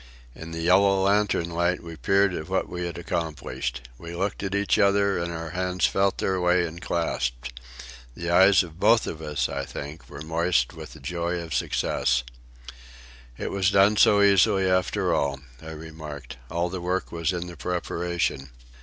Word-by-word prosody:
In 80 +5 -9
the 80 0 -5
yellow 95 +2 +4
lantern 100 -4 +1
light 85 +1 0
we 85 -1 -8
peered 95 +7 +2
at 80 0 -5
what 95 - 0
we 90 0 -4
had 85 - -6
accomplished. 80 -7 -4
We 85 0 -8
looked 95 +3 -2
at 95 0 -2
each 100 0 +1
other, 100 -1 +3
and 85 0 -3
our 80 -1 -5
hands 90 -1 0
felt 95 0 +1
their 95 -1 0
way 90 0 +3
and 85 +1 -8
clasped. - - -2 0.6
The 85 0 -3
eyes 95 +2 +6
of 85 -1 -12
both 115 +3 +4
of 80 - -6
us, 75 -2 -1
I - - -4
think, 75 +3 -8
were 70 +2 -8
moist 80 -5 +1
with - - -10
the - - -13
joy 85 +5 -2
of 85 -2 -6
success. - - 0 1.1
"It - - -4
was 95 -1 +2
done 100 +2 +4
so 100 -1 +5
easily 100 -1 +4
after 90 0 +1
all," 70 -1 0 0.2
I 80 - -9
remarked. 80 -3 -9
"All 85 +2 -1
the 90 0 -5
work 90 +2 -2
was 85 +1 -1
in 90 -1 -3
the 90 -1 -9
preparation." 85 -4 -2
85 Hz, 180 wpm, -25 LUFS, 80-95 Hz, 1.1 s, eyes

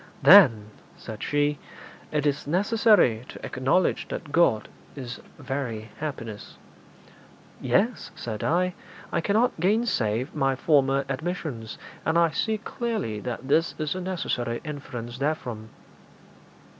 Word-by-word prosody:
'Then,' 115 - +7 0.3
said 110 -2 -9
she, 145 0 0 0.5
'it 150 -1 0
is 145 0 0
necessary 195 - +3
to - - -8
acknowledge 135 +8 +1
that 150 - -6
God 130 -10 +3 0.3
is 125 -3 -7 0.2
very 115 -6 -4
happiness.' 115 -9 -6 1.0
'Yes,' 190 - +1
said 110 -3 -5
I; 180 +2 +1 0.4
'I 170 - 0
cannot 210 +3 +1
gainsay 175 - +1
my 135 -2 +1
former 135 -1 +2
admissions, 135 -6 -4 0.3
and 160 +1 +1
I 170 -1 +4
see 220 +8 0
clearly 215 - -3
that 125 +3 -5
this 160 +4 +2
is 155 -2 -1
a 185 - -5
necessary 125 -10 -2
inference 125 -5 -7
therefrom.' 125 -7 -3
145 Hz, 120 wpm, -26 LUFS, 120-175 Hz, 1.0 s, Then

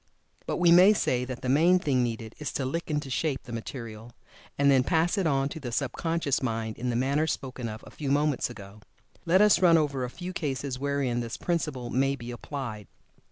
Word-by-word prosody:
But - - -1
we 175 -1 +4
may 185 +4 +8
say 125 -10 0
that 125 -1 -7
the - - -2
main 165 +8 +5
thing 140 -8 +1
needed 115 -2 -3
is 150 - -4
to 135 - -2
"lick 165 +7 -3
into 150 -3 -2
shape" 140 +1 -1
the 125 - -11
material, 115 -1 -7 0.4
and 140 0 +4
then 130 -2 +4
pass 165 +5 +2
it 195 -5 +1
on 135 -2 +1
to 160 - -7
the 125 -5 -6
sub 130 +2 -1
conscious 165 -4 -1
mind 115 -3 -3
in 125 +1 -2
the 120 - -1
manner 140 +5 +1
spoken 130 -5 -4
of 110 0 -8
a - - -12
few 145 -3 -5
moments 145 -1 +1
ago. 105 -2 -11 0.5
Let 185 +4 +5
us 210 - +5
run 170 -2 +6
over 140 -4 0
a 125 - -3
few 180 +7 -7
cases 135 -5 -3
wherein 140 -3 -1
this 115 -1 -4
principle 150 -8 -2
may 135 +2 +1
be 120 -2 -8
applied. 120 -4 -6
135 Hz, 215 wpm, -27 LUFS, 120-155 Hz, 0.5 s, may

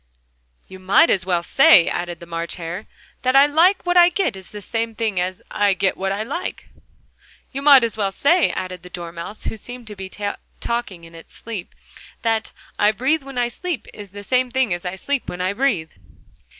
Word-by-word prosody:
"You 190 - -11
might 195 - +4
just - - +5
as 185 -2 -7
well 175 -2 +1
say," 275 - +6
added 175 -1 -3
the 170 - -10
March 170 0 -4
Hare, 175 +4 -6 0.3
"that 255 +1 +1
'I 275 +1 +8
like 335 +7 +3
what 355 0 +2
I 350 0 +8
get' 360 - -1
is 190 -1 -11
the 210 - -8
same 225 +2 -3
thing 215 -4 -1
as 180 +1 -3
'I 205 -2 +2
get 190 0 +1
what 195 0 -2
I 200 +2 -2
like'!" 285 +10 -5 0.8
"You 275 - -4
might 280 -2 +8
just 230 -1 -1
as - - -12
well 200 -2 0
say," 330 - +3
added 185 -1 -5
the 180 - -12
Dormouse, 170 +3 -7
who 225 - -4
seemed 245 +2 -8
to 210 -1 -8
be 190 -1 -7 0.5
talking 235 -7 -3
in 165 0 -14
its 165 0 -14
sleep, 215 -6 -7 0.5
"that 225 -1 0 0.3
'I 210 +1 +4
breathe 275 +8 +1
when 270 -1 -10
I 245 -1 +2
sleep' 285 - -5
is 205 -2 -10
the 205 +2 -10
same 255 +3 +1
thing 260 -6 +1
as 175 +1 -5
'I 180 +1 -3
sleep 280 +7 -3
when 180 - -6
I 185 +2 0
breathe'!" 200 -10 0
210 Hz, 215 wpm, -21 LUFS, 185-260 Hz, 0.8 s, I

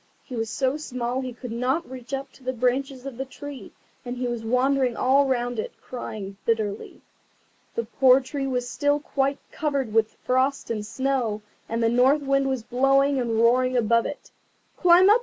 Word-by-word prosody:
He 255 - -8
was 225 -1 -2
so 260 +4 0
small 255 -3 -3
that 260 - -4
he - - -4
could 245 0 -8
not 255 +8 0
reach 255 -1 -10
up 275 0 -3
to 265 - -20
the 255 0 -2
branches 255 +2 -1
of 270 -4 -6
the 265 - -2
tree, 285 +1 -9 0.3
and 245 0 -5
he 250 0 -1
was 240 -2 -3
wandering 255 +1 +2
all 275 +2 +4
round 245 -2 -1
it, - - -4
crying 205 -5 -7
bitterly. 215 -3 -2 0.7
The 465 - 0
poor 265 -1 +5
tree 270 +1 -4
was 250 -2 -1
still 290 +3 +1
quite 275 -1 0
covered 280 -7 -1
with 220 -1 +2
frost 260 0 +1
and 215 -2 -2
snow, 240 -3 -1 0.3
and 230 +1 -1
the - - +4
North 260 +5 +4
Wind 275 0 +2
was 260 -4 -2
blowing 270 +3 +3
and 235 -2 -1
roaring 255 +2 +3
above 230 0 +3
it. 290 - -8 0.4
"Climb 360 +1 +6
up! 425 +3 +6
255 Hz, 190 wpm, -25 LUFS, 235-275 Hz, 0.7 s, Climb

